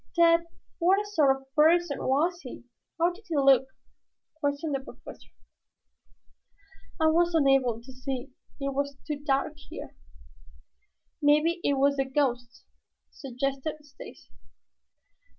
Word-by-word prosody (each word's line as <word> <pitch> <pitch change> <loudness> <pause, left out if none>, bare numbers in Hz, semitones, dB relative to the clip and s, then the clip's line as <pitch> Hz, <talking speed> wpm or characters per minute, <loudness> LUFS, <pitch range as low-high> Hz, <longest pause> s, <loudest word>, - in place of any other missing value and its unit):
"Tad, 335 0 +4 0.3
what 385 +4 +3
sort 330 -9 +2
of 270 0 -21
person 320 0 +3
was 330 +7 0
he? 255 - -10 0.3
How 340 +1 +2
did 400 +5 -15
he 335 - -3
look?" 270 -1 +5 0.7
questioned 290 0 -2
the 275 - 0
Professor. 265 - -13 1.7
"I 320 - +2
was 335 +2 +3
unable 270 -6 +3
to 260 +1 -12
see. 260 -1 -6 0.3
It 275 0 -2
was 280 0 -3
too 300 -2 -4
dark 280 0 0 0.2
here." - - -9 1.3
"Maybe 300 +4 +3
it 285 - +2
was 280 +1 +2
the 270 - +1
ghost," 250 -3 -2 0.5
suggested 275 +3 -4
Stacy. 290 - -14
285 Hz, 120 wpm, -27 LUFS, 270-330 Hz, 1.7 s, look